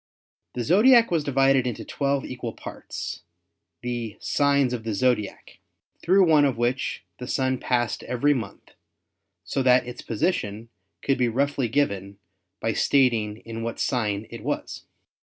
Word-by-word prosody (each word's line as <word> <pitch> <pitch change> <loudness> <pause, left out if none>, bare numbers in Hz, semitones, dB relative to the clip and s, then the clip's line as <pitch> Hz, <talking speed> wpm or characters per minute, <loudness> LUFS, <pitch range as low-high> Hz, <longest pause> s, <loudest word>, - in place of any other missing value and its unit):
The 125 - -3
Zodiac 230 - +5
was 165 -3 +1
divided 135 -2 +3
into 120 - -4
twelve 140 -1 -1
equal 125 -3 -5
parts, - - -7 0.6
the 120 -3 -4
"signs 140 -3 +2
of 115 -2 -4
the 110 -2 -2
Zodiac," 105 -2 -1 0.4
through 190 +2 +5
one 155 -2 +5
of 135 -5 +1
which 120 +2 -1 0.2
the 125 - -6
Sun 130 -1 0
passed 120 -3 0
every 135 +4 +2
month, 110 -7 -6 0.7
so 135 - -2
that 125 -1 +4
its 125 0 -7
position 115 - -2 0.3
could 135 -1 +1
be 125 - +3
roughly 135 +1 0
given 100 -7 -1 0.4
by 110 0 -1
stat 135 0 +3
ing 105 -2 -3
in 115 0 -6
what 115 0 -4
sign 110 -5 -1
it 115 - -8
was. - - -4
125 Hz, 150 wpm, -25 LUFS, 115-140 Hz, 0.7 s, Zodiac